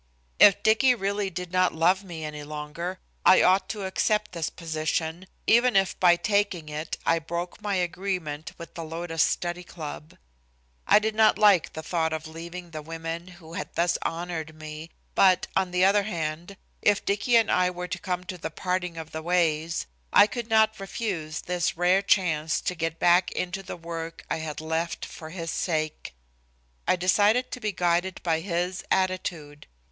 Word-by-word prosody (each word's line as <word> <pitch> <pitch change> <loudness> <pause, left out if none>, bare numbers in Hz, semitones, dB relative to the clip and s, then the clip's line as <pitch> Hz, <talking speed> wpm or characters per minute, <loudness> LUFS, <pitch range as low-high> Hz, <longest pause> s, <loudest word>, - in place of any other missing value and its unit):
If 200 - +7
Dicky 245 +4 +5
really 200 -1 -1
did 180 -1 -6
not 185 -1 +2
love 180 +4 +3
me 165 -4 -7
any 150 -1 -6
longer, 150 +5 -5 0.3
I - - +7
ought 185 +1 +3
to 205 -3 -4
accept 210 +2 0
this 170 -3 -2
position, 160 +2 -3 0.2
even 240 +1 +4
if 195 -2 +3
by 175 -1 +6
taking 200 -4 0
it 150 +2 -4
I 165 0 +3
broke 170 +4 -5
my 205 -1 -1
agreement 175 -4 -3
with 170 -2 -10
the 165 - -6
Lotus 165 0 -3
Study 175 +3 0
Club. 155 -2 -8 0.7
I - - +7
did 215 +1 +1
not 220 0 +4
like 205 -5 +4
the 160 - -6
thought 160 -2 0
of 160 0 -4
leaving 170 +2 -8
the 155 -1 -6
women 165 +2 -6
who 175 -2 -13
had - - -6
thus 170 +1 +1
honored 165 -2 -4
me, 155 +1 -8 0.2
but, 185 -2 +4
on 190 -1 +2
the 180 +1 +3
other 200 +1 +5
hand, 170 -1 -4 0.2
if 205 -1 +2
Dicky 205 +5 +1
and 225 -1 +4
I 180 0 +3
were 180 0 -5
to 180 +1 -4
come 180 -1 -3
to 180 0 -7
the - - -4
parting 180 +1 -2
of 160 -1 -7
the 160 - -5
ways, 165 -1 +1 0.3
I - - +8
could 235 +1 -5
not 220 -1 +3
refuse 185 -6 -4
this 180 -2 -1
rare 180 +2 +4
chance 160 -6 +2
to - - -1
get 165 -1 -3
back 175 +1 +4
into 180 +2 -3
the 190 -1 -7
work 165 -1 -7
I - - +1
had 155 -1 -5
left 160 +1 -2
for 155 - -10
his 165 -1 -5
sake. 155 - -2 0.7
I - - +4
decided 205 +7 +3
to - - -5
be 215 -3 -1
guided 175 0 0
by 165 -2 +1
his 180 +1 -2
attitude. 175 -6 -1
175 Hz, 180 wpm, -26 LUFS, 160-190 Hz, 0.7 s, I